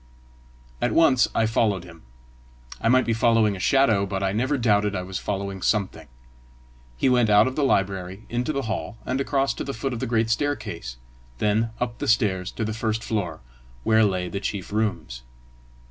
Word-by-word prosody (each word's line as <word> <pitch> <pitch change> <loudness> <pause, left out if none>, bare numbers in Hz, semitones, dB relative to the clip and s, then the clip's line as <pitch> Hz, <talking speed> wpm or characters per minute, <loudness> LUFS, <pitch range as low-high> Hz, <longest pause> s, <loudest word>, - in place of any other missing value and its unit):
At 120 -2 +1
once 130 -7 +5
I 115 - +3
followed 110 -4 +1
him: 85 -2 -14 0.8
I - - +1
might 130 +1 +4
be 115 - +1
following 115 -2 +3
a - - -8
shadow, 110 -3 +3
but 95 0 -3
I 95 - +1
never 130 +8 0
doubted 105 -4 +2
I 90 - -2
was 95 0 -5
following 100 -1 -4
something. 100 -2 -1 0.9
He - - +1
went 125 -3 +3
out 105 +1 +6
of 130 - -2
the 150 - 0
library 95 -4 -1
into 120 +4 -2
the 140 -2 -2
hall, 110 +1 -4
and 130 +2 -1
across 135 0 0
to - - -5
the 140 - -5
foot 130 +3 -3
of 120 - -4
the 130 - -2
great 115 -1 +1
staircase, 105 - -2 0.4
then 105 - +1
up 120 -1 -3
the - - -3
stairs 95 -5 +1
to 110 - -3
the 110 - -3
first 110 0 -2
floor, 95 -8 -3 0.4
where 110 0 +4
lay 95 -3 0
the 100 +3 -4
chief 100 -1 -4
rooms. 105 - -2
110 Hz, 190 wpm, -24 LUFS, 95-120 Hz, 0.9 s, out